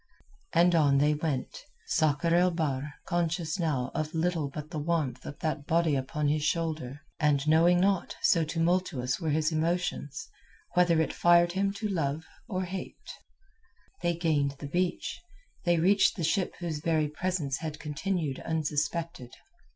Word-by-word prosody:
And 175 +1 +4
on 145 -4 +4
they 150 +2 +3
went, 150 -3 -3 0.2
Sakr 155 +2 +1
el 180 +1 +5
Bahr 150 -4 -2
conscious 170 -1 -1
now 140 -7 -1
of 155 +2 -3
little 160 -3 0
but 150 +2 -8
the 155 - -3
warmth 155 -3 -1
of 145 - -7
that 155 -2 -2
body 165 -2 +2
upon 140 +3 -1
his 150 +1 +1
shoulder, 155 -4 -2 0.2
and 150 -2 +2
knowing 170 +3 +5
not, 195 0 +1
so 165 - +4
tumultuous 165 -5 0
were 160 - -1
his 155 +2 +1
emotions, 160 -3 -2 0.5
whether 175 -2 +4
it 160 - 0
fired 175 0 +4
him 195 +2 0
to 210 +2 -3
love 160 -5 -2 0.2
or 190 -5 -2
hate. 185 +1 -7 0.9
They 170 0 +1
gained 150 -5 0
the 145 - -8
beach; 180 - -2 0.4
they 175 -1 +3
reached 195 +5 +4
the 175 - -4
ship 180 +4 0
whose 165 -4 -4
very 155 -1 +1
presence 150 -3 -2
had 155 -2 -5
continued 155 -1 -2
unsuspected. 155 -3 -2
160 Hz, 150 wpm, -29 LUFS, 150-175 Hz, 0.9 s, el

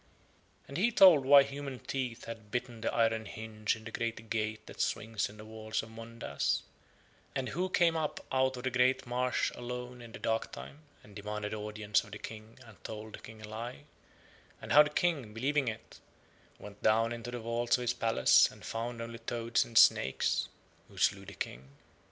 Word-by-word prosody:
And 140 - -6
he 230 +6 +3
told 180 - +8
why 140 +1 +9
human 140 -1 -6
teeth 125 -2 -4
had 110 -2 -8
bitten 120 0 -3
the - - 0
iron 115 -1 +2
hinge 110 0 -2
in 110 - -12
the 115 - -8
great 115 -1 -4
gate 110 -1 -2
that - - -6
swings 110 0 -1
in 105 - -13
the 110 - -10
walls 110 0 -3
of 110 - -11
Mondas, 115 +1 -2 0.7
and 130 -2 -1
who 180 +5 -1
came 170 -2 +3
up 155 -2 -1
out 130 0 +2
of 125 - -7
the 130 0 +3
marsh 125 +1 0
alone 125 0 -6
in 120 -1 -11
the - - -8
darktime 115 +5 -3 0.2
and 105 -1 -16
demanded 105 0 -4
audience 105 -1 0
of 105 - -14
the 105 - -6
King 110 +1 -9
and 110 -6 -16
told 110 0 -7
the - - -7
King 110 0 -12
a - - -7
lie, 120 +6 -6 0.8
and - - -8
how 150 - +10
the 150 - +3
King, 150 -9 0
believing 135 +3 +1
it, 110 0 -6 0.6
went 105 -1 -12
down 115 +2 +3
into 120 0 -6
the 120 - -4
vaults 120 +1 +1
of 125 - -4
his 120 0 +1
palace 115 - +5
and - - -13
found 115 +1 -4
only 115 0 -7
toads 115 0 0
and 115 - -4
snakes, 65 -10 +4 0.4
who - - -17
slew 100 0 +2
the 100 - -9
King. 65 +3 -6
115 Hz, 190 wpm, -32 LUFS, 110-125 Hz, 0.8 s, how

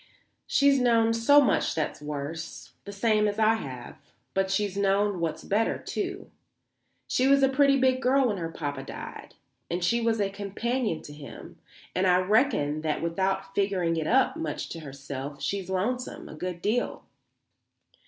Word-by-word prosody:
She's 280 -1 +4
known 230 -2 +3
so 230 +6 +6
much 280 - +2
that's 155 -2 -2
worse, 150 +2 -6
the 200 - -6
same 210 +1 +2
as 205 0 -2
I 220 0 +4
have. 130 - -7 0.3
But 195 0 +1
she's 195 0 0
known 200 -1 +1
what's 165 -2 -2
better, 215 +3 +1
too; 385 -1 -5 0.8
she 255 - +2
was 275 0 +5
a - - +7
pretty 275 +1 +4
big 260 0 +2
girl 265 0 +3
when 205 - -1
her 165 -2 -3
Poppa 145 -3 -4
died - - -9 0.3
and 175 +1 -2
she 235 +7 +2
was 225 -1 +1
a 200 -1 0
companion 205 0 -2
to 145 - -10
him 145 -1 -11 0.3
and 185 +1 +1
I 180 0 +5
reckon 185 - +2
that 155 0 -1
without 190 +3 -1
figuring 190 -4 +1
it 160 -1 -2
up 265 +1 +3
much 155 -2 -4
to 165 - -6
herself 140 -1 -7
she's 190 +7 -3
lonesome 235 +7 -2
a - - -9
good 175 +2 -5
deal." 235 +4 -1
195 Hz, 165 wpm, -27 LUFS, 165-235 Hz, 0.8 s, a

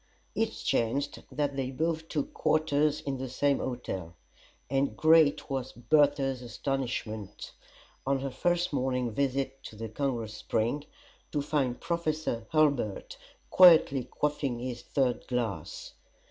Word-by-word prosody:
It 225 - +1
chanced 135 +3 -1
that 145 -2 -1
they 135 -2 -2
both 160 +4 -2
took 145 -3 -2
quarters 150 -1 +1
in 135 -2 -3
the 130 0 -4
same 140 +2 +1
hotel; 95 -9 -4 0.5
and 135 +1 0
great 160 -2 +5
was 135 -2 -3
Bertha's 140 0 +2
astonishment; 115 -5 -4 0.5
on 135 -1 +1
her 135 0 -3
first 175 +5 0
morning 125 -3 0
visit 135 +2 -1
to - - -9
the 115 +1 -6
Congress 115 -3 -2
Spring, 120 +6 -1 0.5
to 145 -2 -1
find 135 -4 0
Professor 155 -9 -2
Hurlbut 140 -10 +1 0.4
quietly 160 -8 +7
quaffing 145 -2 -1
his 120 0 -5
third 130 -1 -1
glass. 115 -10 -3
135 Hz, 125 wpm, -29 LUFS, 120-150 Hz, 0.5 s, quietly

